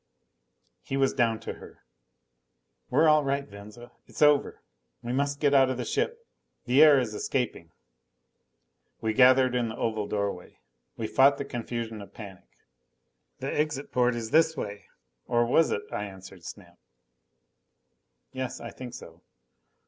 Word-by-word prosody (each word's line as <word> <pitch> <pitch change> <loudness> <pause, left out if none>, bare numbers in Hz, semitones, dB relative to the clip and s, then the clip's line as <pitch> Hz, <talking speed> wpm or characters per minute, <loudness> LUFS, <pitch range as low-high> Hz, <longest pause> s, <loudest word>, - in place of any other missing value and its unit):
He 135 - -4
was 135 -1 +2
down 115 -4 +1
to - - -5
her. - - -15 1.1
"We're 150 +6 +4
all 155 -1 +5
right, 140 0 -1
Venza. 105 +4 -12 0.2
It's - - -1
over. 150 -1 +3 0.4
We 120 +1 -3
must 140 +1 -1
get 145 -1 +2
out 135 -1 +5
of 130 - -2
the 125 - -4
ship. 470 0 -2 0.4
The 130 +3 +4
air 150 -2 +8
is 120 -4 -3
escaping." 105 -8 -3 1.3
We 110 -1 -1
gathered 130 +1 +5
in 120 -2 0
the 110 - -7
oval 110 -2 -2
doorway. 100 -3 -4 0.4
We 115 - -3
fought 135 +5 +4
the 140 - -4
confusion 115 -3 -5
of 100 - -13
panic. 100 -5 -11 0.9
"The 135 - -3
exit 150 -2 -2
port 125 -1 +2
is 115 -1 -5
this 160 -1 +3
way." 100 -4 -6 0.4
Or 120 -1 +2
was 155 +7 +3
it? 100 - -2
I 105 - -3
answered 95 -3 -12
Snap, 90 -2 -11 1.5
"Yes, 130 -1 -4
I 115 - -8
think 125 -1 -9
so." 85 -6 -12
125 Hz, 150 wpm, -27 LUFS, 105-140 Hz, 1.5 s, air